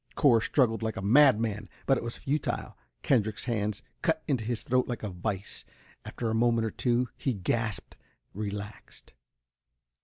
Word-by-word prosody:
Cor 125 Hz, -7 st, +5 dB
struggled 115 Hz, -3 st, +2 dB
like 110 Hz, -1 st, -2 dB
a -, -, -3 dB
madman, 110 Hz, -3 st, +4 dB, 0.2 s
but 135 Hz, -, +4 dB
it 120 Hz, -, -3 dB
was 120 Hz, 0 st, -5 dB
futile. 145 Hz, +3 st, -2 dB, 0.3 s
Kendrick's 110 Hz, -5 st, +1 dB
hands 105 Hz, -4 st, -2 dB, 0.2 s
cut 160 Hz, -2 st, +1 dB
into 130 Hz, -7 st, 0 dB
his 115 Hz, +1 st, -2 dB
throat 130 Hz, 0 st, +1 dB
like 120 Hz, -2 st, -4 dB
a 105 Hz, -, -3 dB
vice. 95 Hz, +2 st, -4 dB, 0.4 s
After 115 Hz, -2 st, -3 dB
a -, -, 0 dB
moment 115 Hz, 0 st, +2 dB
or 110 Hz, -, -2 dB
two, 125 Hz, 0 st, +1 dB
he 130 Hz, -4 st, -1 dB
gasped, 105 Hz, -3 st, -2 dB, 0.4 s
relaxed. 105 Hz, +1 st, -7 dB
115 Hz, 155 wpm, -29 LUFS, 105-125 Hz, 0.4 s, Cor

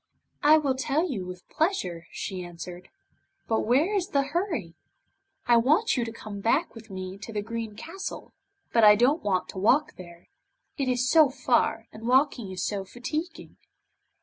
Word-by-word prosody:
'I 305 Hz, +2 st, +7 dB
will 285 Hz, -4 st, +1 dB
tell 280 Hz, +6 st, 0 dB
you 200 Hz, -, -4 dB
with 180 Hz, 0 st, -9 dB
pleasure,' 190 Hz, -, -1 dB
she 185 Hz, -3 st, -5 dB
answered, 175 Hz, +1 st, -9 dB, 0.6 s
'but 225 Hz, -1 st, 0 dB
where 290 Hz, -, +3 dB
is 385 Hz, -4 st, 0 dB
the 280 Hz, -2 st, +1 dB
hurry? 320 Hz, -, -2 dB, 0.7 s
I 240 Hz, -1 st, +5 dB
want 310 Hz, -, +3 dB
you 245 Hz, -, 0 dB
to 230 Hz, -, -5 dB
come 215 Hz, -3 st, -8 dB
back 270 Hz, -, +1 dB
with 225 Hz, -1 st, -12 dB
me 190 Hz, 0 st, -6 dB
to 220 Hz, -, -8 dB
the 210 Hz, -2 st, -3 dB
Green 225 Hz, -1 st, -5 dB
Castle, 380 Hz, -, -7 dB, 0.4 s
but 230 Hz, -, +4 dB
I 210 Hz, 0 st, +9 dB
don't 260 Hz, +9 st, +3 dB
want 185 Hz, -3 st, 0 dB
to 190 Hz, -, -6 dB
walk 260 Hz, +10 st, +2 dB
there, 170 Hz, -1 st, -12 dB, 0.5 s
it 275 Hz, -, -2 dB
is 250 Hz, 0 st, +1 dB
so 310 Hz, 0 st, +6 dB
far, 265 Hz, -, +1 dB
and 225 Hz, +1 st, -8 dB
walking 255 Hz, -5 st, +2 dB
is 185 Hz, -2 st, -4 dB
so 200 Hz, -2 st, -2 dB
fatiguing. 300 Hz, -, -6 dB
235 Hz, 175 wpm, -27 LUFS, 195-295 Hz, 0.7 s, I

